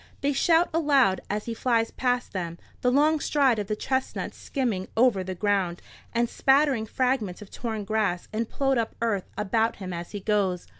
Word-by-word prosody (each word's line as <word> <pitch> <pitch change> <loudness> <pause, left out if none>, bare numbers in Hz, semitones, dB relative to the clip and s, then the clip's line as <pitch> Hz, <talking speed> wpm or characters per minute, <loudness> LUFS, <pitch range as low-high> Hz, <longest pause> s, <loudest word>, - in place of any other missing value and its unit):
They 285 +1 +1
shout 330 +5 +4
aloud 280 - +3
as 210 +1 -2
he 235 - -3
flies 230 -1 +1
past 250 -1 -1
them, 170 -3 -4 0.2
the 250 - +3
long 300 +4 +3
stride 275 -7 +2
of 205 - -3
the 215 - -1
chestnut 260 +4 -2
skimming 225 -9 -2
over 225 -5 +4
the 185 0 -5
ground, 190 -3 0 0.3
and 235 0 +1
spattering 270 -3 +2
fragments 250 -7 0
of 210 -2 -12
torn 220 -3 -4
grass 200 -4 -1
and 225 +1 -2
ploughed 270 -2 +1
up 225 - -2
earth 220 -5 -1
about 220 +2 +1
him 185 -2 -6
as 170 0 -6
he 205 - -5
goes. 195 -3 0
225 Hz, 185 wpm, -26 LUFS, 200-260 Hz, 0.3 s, shout